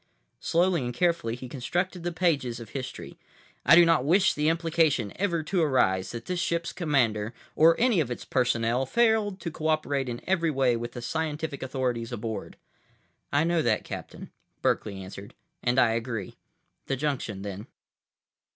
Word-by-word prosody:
Slowly 170 Hz, -3 st, +2 dB
and 120 Hz, -, -2 dB
carefully, 170 Hz, -9 st, +1 dB
he 125 Hz, +1 st, -8 dB
constructed 175 Hz, +8 st, -2 dB
the 175 Hz, +1 st, -2 dB
pages 150 Hz, -9 st, 0 dB
of 115 Hz, -2 st, -9 dB
history. 130 Hz, -1 st, -7 dB, 0.4 s
"I -, -, +7 dB
do 175 Hz, 0 st, +8 dB
not 165 Hz, -5 st, +3 dB
wish 180 Hz, +7 st, +4 dB
the 150 Hz, +1 st, +1 dB
implication 160 Hz, -, +1 dB
ever 170 Hz, -5 st, 0 dB
to 180 Hz, +3 st, 0 dB
arise 95 Hz, -, +2 dB
that 120 Hz, -, -7 dB
this 180 Hz, -1 st, -2 dB
ship's 170 Hz, -2 st, -1 dB
commander, 120 Hz, -, 0 dB, 0.2 s
or 165 Hz, +1 st, +5 dB
any 235 Hz, -5 st, +3 dB
of 145 Hz, -6 st, 0 dB
its 120 Hz, -, -5 dB
personnel, 125 Hz, 0 st, +1 dB
failed 220 Hz, -, +2 dB
to 170 Hz, -, -4 dB
cooperate 155 Hz, -4 st, -1 dB
in 120 Hz, 0 st, -4 dB
every 175 Hz, -3 st, +1 dB
way 130 Hz, -4 st, +2 dB
with 120 Hz, 0 st, -5 dB
the 120 Hz, -, -7 dB
scientific 155 Hz, +1 st, -3 dB
authorities 125 Hz, -3 st, -2 dB
aboard." 110 Hz, -1 st, -5 dB, 0.7 s
"I 145 Hz, +2 st, +3 dB
know 170 Hz, 0 st, +2 dB
that, 110 Hz, -7 st, +1 dB
Captain," -, -, -8 dB, 0.3 s
Berkeley 100 Hz, -3 st, 0 dB
answered. 95 Hz, +1 st, -10 dB, 0.3 s
"And 120 Hz, +2 st, +1 dB
I 120 Hz, -3 st, +5 dB
agree. 115 Hz, -3 st, -3 dB, 0.5 s
The 135 Hz, -, 0 dB
junction, 130 Hz, -8 st, -3 dB
then." 100 Hz, +1 st, -6 dB
140 Hz, 160 wpm, -27 LUFS, 120-170 Hz, 0.7 s, do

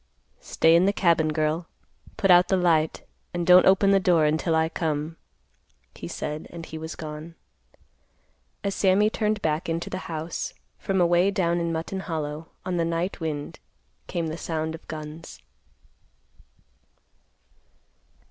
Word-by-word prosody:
"Stay 165 Hz, +1 st, +3 dB
in 170 Hz, +2 st, +5 dB
the -, -, +4 dB
cabin, 170 Hz, -5 st, +3 dB
girl, 155 Hz, +2 st, -1 dB, 0.5 s
put 195 Hz, -, +3 dB
out 180 Hz, 0 st, +7 dB
the 190 Hz, -, +2 dB
light, 165 Hz, -3 st, +1 dB, 0.3 s
and 175 Hz, -1 st, -1 dB
don't 180 Hz, +1 st, +7 dB
open 195 Hz, +1 st, +5 dB
the 195 Hz, -, +5 dB
door 175 Hz, -4 st, +3 dB
until 160 Hz, +2 st, +1 dB
I 160 Hz, 0 st, +3 dB
come," 160 Hz, -1 st, -2 dB, 0.8 s
he -, -, -8 dB
said 150 Hz, +1 st, -5 dB
and 165 Hz, -1 st, -8 dB
he -, -, -9 dB
was 160 Hz, 0 st, -6 dB
gone. 155 Hz, +1 st, -8 dB, 1.3 s
As 200 Hz, -, -1 dB
Sammy 200 Hz, +3 st, +3 dB
turned 215 Hz, -2 st, -1 dB
back 155 Hz, +2 st, -1 dB
into 165 Hz, +1 st, -3 dB
the 185 Hz, -, -3 dB
house, 160 Hz, +1 st, -4 dB, 0.2 s
from 195 Hz, -1 st, -1 dB
away 175 Hz, +2 st, +4 dB
down 175 Hz, -4 st, 0 dB
in 170 Hz, 0 st, -1 dB
Mutton 165 Hz, +4 st, -3 dB
Hollow, 160 Hz, -2 st, -4 dB, 0.2 s
on 185 Hz, -1 st, -1 dB
the 170 Hz, -, +2 dB
night 170 Hz, +4 st, -2 dB
wind, 150 Hz, -3 st, -4 dB, 0.5 s
came 170 Hz, -1 st, -2 dB
the 160 Hz, +1 st, -4 dB
sound 160 Hz, -1 st, -3 dB
of 160 Hz, -, -11 dB
guns. 155 Hz, +1 st, -8 dB
165 Hz, 145 wpm, -25 LUFS, 160-180 Hz, 1.3 s, out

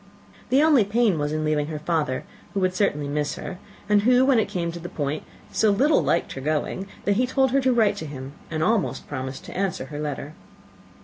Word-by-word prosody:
The 270 Hz, +4 st, +4 dB
only 300 Hz, -8 st, +6 dB
pain 205 Hz, -4 st, +2 dB
was 145 Hz, 0 st, -1 dB
in 155 Hz, 0 st, -1 dB
leaving 150 Hz, -1 st, +1 dB
her 155 Hz, -1 st, -4 dB
father, 150 Hz, -4 st, -1 dB, 0.3 s
who -, -, +2 dB
would 185 Hz, 0 st, +2 dB
certainly 150 Hz, -7 st, 0 dB
miss 145 Hz, +1 st, -1 dB
her, 180 Hz, -, -7 dB, 0.3 s
and 210 Hz, -1 st, +4 dB
who, 250 Hz, +3 st, +5 dB
when 265 Hz, -4 st, +4 dB
it 215 Hz, -, 0 dB
came 175 Hz, -4 st, -2 dB
to 170 Hz, -, -7 dB
the 175 Hz, +1 st, -7 dB
point, 145 Hz, 0 st, -2 dB, 0.3 s
so 220 Hz, -, +3 dB
little 275 Hz, +9 st, +4 dB
liked -, -, +1 dB
her 135 Hz, -, -6 dB
going, 155 Hz, +6 st, -1 dB, 0.2 s
that 205 Hz, 0 st, +2 dB
he 250 Hz, +1 st, +2 dB
told 265 Hz, 0 st, +2 dB
her 275 Hz, +1 st, +3 dB
to 260 Hz, 0 st, +3 dB
write 215 Hz, -4 st, +3 dB
to 160 Hz, -, -5 dB
him, 135 Hz, -1 st, -7 dB, 0.2 s
and 155 Hz, -1 st, -1 dB
almost 220 Hz, -1 st, 0 dB
promised 130 Hz, -2 st, -5 dB
to -, -, -9 dB
answer 190 Hz, -7 st, -1 dB
her 145 Hz, -, -4 dB
letter. 150 Hz, 0 st, -4 dB
180 Hz, 225 wpm, -24 LUFS, 150-225 Hz, 0.3 s, only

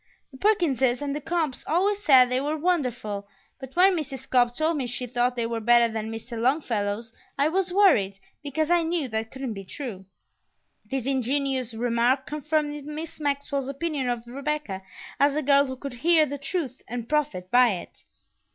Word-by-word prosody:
The 265 Hz, -, -13 dB
Perkinses 275 Hz, -, +2 dB
and 280 Hz, 0 st, -2 dB
the 300 Hz, -, -4 dB
Cobbs 320 Hz, -3 st, -2 dB
always 400 Hz, +5 st, +1 dB
said 260 Hz, -6 st, +7 dB
they 255 Hz, +1 st, +1 dB
were 300 Hz, +2 st, -1 dB
wonderful, 245 Hz, -, -1 dB, 0.3 s
but 265 Hz, -1 st, -10 dB
when 370 Hz, +2 st, +5 dB
Mrs. 270 Hz, -5 st, -5 dB
Cobb 245 Hz, -1 st, +3 dB
told 315 Hz, +2 st, +1 dB
me 260 Hz, -3 st, -2 dB
she 245 Hz, +1 st, -3 dB
thought 245 Hz, +1 st, 0 dB
they 235 Hz, -1 st, -1 dB
were 230 Hz, 0 st, -2 dB
better 235 Hz, 0 st, +4 dB
than 220 Hz, 0 st, -3 dB
Mr. 225 Hz, +1 st, -6 dB
Longfellow's 230 Hz, -5 st, 0 dB, 0.2 s
I 285 Hz, +2 st, +3 dB
was 370 Hz, +2 st, 0 dB
worried, 295 Hz, -, +4 dB, 0.2 s
because 300 Hz, +3 st, -1 dB
I 350 Hz, -1 st, +5 dB
knew 325 Hz, -3 st, -1 dB
that 220 Hz, 0 st, -2 dB
couldn't 265 Hz, -2 st, -5 dB
be 195 Hz, -1 st, -7 dB
true." 195 Hz, -2 st, -7 dB, 0.8 s
This 265 Hz, -3 st, -2 dB
ingenuous 265 Hz, -2 st, 0 dB
remark 240 Hz, +3 st, +1 dB
confirmed 300 Hz, 0 st, -2 dB
Miss 305 Hz, +2 st, -7 dB
Maxwell's 280 Hz, -2 st, -1 dB
opinion 280 Hz, -2 st, -2 dB
of 240 Hz, -1 st, -3 dB
Rebecca 275 Hz, -5 st, -3 dB, 0.4 s
as 285 Hz, 0 st, +4 dB
a 305 Hz, -, 0 dB
girl 280 Hz, 0 st, +4 dB
who 260 Hz, -, -5 dB
could 270 Hz, 0 st, -7 dB
hear 315 Hz, +5 st, +4 dB
the 285 Hz, 0 st, -5 dB
truth 280 Hz, -3 st, -3 dB
and 240 Hz, -1 st, -5 dB
profit 285 Hz, -12 st, -1 dB
by 245 Hz, -3 st, +5 dB
it. 180 Hz, -, -9 dB
270 Hz, 180 wpm, -26 LUFS, 240-300 Hz, 0.8 s, said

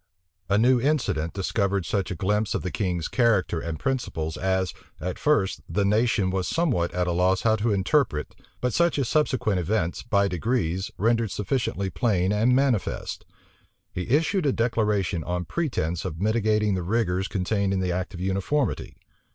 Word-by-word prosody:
A 100 Hz, -, +3 dB
new 120 Hz, +2 st, +4 dB
incident 105 Hz, -, 0 dB
discovered 100 Hz, -1 st, 0 dB
such 100 Hz, -3 st, -1 dB
a -, -, -3 dB
glimpse 105 Hz, +4 st, 0 dB
of -, -, -2 dB
the 90 Hz, -, -3 dB
king's 90 Hz, -5 st, -1 dB
character 110 Hz, -8 st, +2 dB
and 80 Hz, -1 st, -4 dB
principles 85 Hz, -, -2 dB
as, 95 Hz, 0 st, 0 dB, 0.3 s
at 90 Hz, +3 st, -4 dB
first, 110 Hz, -11 st, +1 dB
the 100 Hz, -1 st, +1 dB
nation 105 Hz, -2 st, +2 dB
was 95 Hz, -1 st, -1 dB
somewhat 130 Hz, -, +1 dB
at 90 Hz, 0 st, 0 dB
a 90 Hz, -, 0 dB
loss 90 Hz, +2 st, +2 dB
how 110 Hz, -1 st, +4 dB
to 110 Hz, +1 st, 0 dB
interpret, 100 Hz, -, +1 dB, 0.3 s
but 125 Hz, -1 st, 0 dB
such 170 Hz, -2 st, +2 dB
as 135 Hz, -4 st, 0 dB
subsequent 130 Hz, -10 st, +1 dB
events, 90 Hz, -1 st, -1 dB
by 100 Hz, -3 st, +2 dB
degrees, 95 Hz, -1 st, -1 dB
rendered 115 Hz, +1 st, +2 dB
sufficiently 100 Hz, -2 st, -2 dB
plain 100 Hz, -6 st, +1 dB
and 115 Hz, +4 st, +3 dB
manifest. 130 Hz, -6 st, -1 dB, 0.6 s
He 90 Hz, +5 st, -5 dB
issued 160 Hz, -, +2 dB
a 135 Hz, -, +2 dB
declaration 105 Hz, -7 st, 0 dB
on 90 Hz, +1 st, -3 dB
pretence 105 Hz, -, -2 dB
of 80 Hz, -, -5 dB
mitigating 105 Hz, 0 st, +2 dB
the 95 Hz, -, -1 dB
rigors 95 Hz, -1 st, 0 dB
contained 100 Hz, +1 st, -1 dB
in 95 Hz, -, 0 dB
the 90 Hz, -1 st, 0 dB
act 95 Hz, +3 st, -3 dB
of -, -, -7 dB
uniformity. 95 Hz, +9 st, -1 dB
100 Hz, 165 wpm, -25 LUFS, 90-120 Hz, 0.6 s, new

